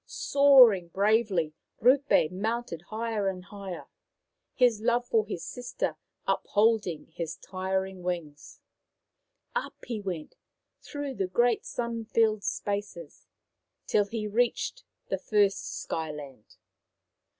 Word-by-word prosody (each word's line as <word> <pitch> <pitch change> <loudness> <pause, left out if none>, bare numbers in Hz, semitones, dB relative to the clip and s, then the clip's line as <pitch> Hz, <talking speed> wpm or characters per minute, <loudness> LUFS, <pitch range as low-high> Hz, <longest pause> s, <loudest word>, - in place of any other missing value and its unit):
Soaring 270 - +6
bravely, 195 -4 +2 0.3
Rupe 260 - +4
mounted 215 -2 -3
higher 220 -2 -1
and 185 -1 -3
higher, 195 -1 -7 0.7
his 240 -5 +3
love 240 +1 +2
for 220 -2 +2
his 170 -5 -5
sister 245 0 -3 0.3
upholding 205 -7 +1
his 165 -2 -4
tiring 190 0 -3
wings. 170 -5 -5 0.9
Up - - -2
he 230 -4 -4
went, 175 -6 -5 0.4
through 290 -2 -5
the 195 -6 -1
great 240 +5 +2
sun 235 -2 -3
filled 220 -2 +2
spaces, 205 - -4 0.6
till 205 - +3
he 215 +1 -4
reached 245 - 0 0.3
the - - -1
first 205 -2 +1
Sky 160 -1 -3
land. 140 -7 -11
210 Hz, 110 wpm, -28 LUFS, 185-235 Hz, 0.9 s, Soaring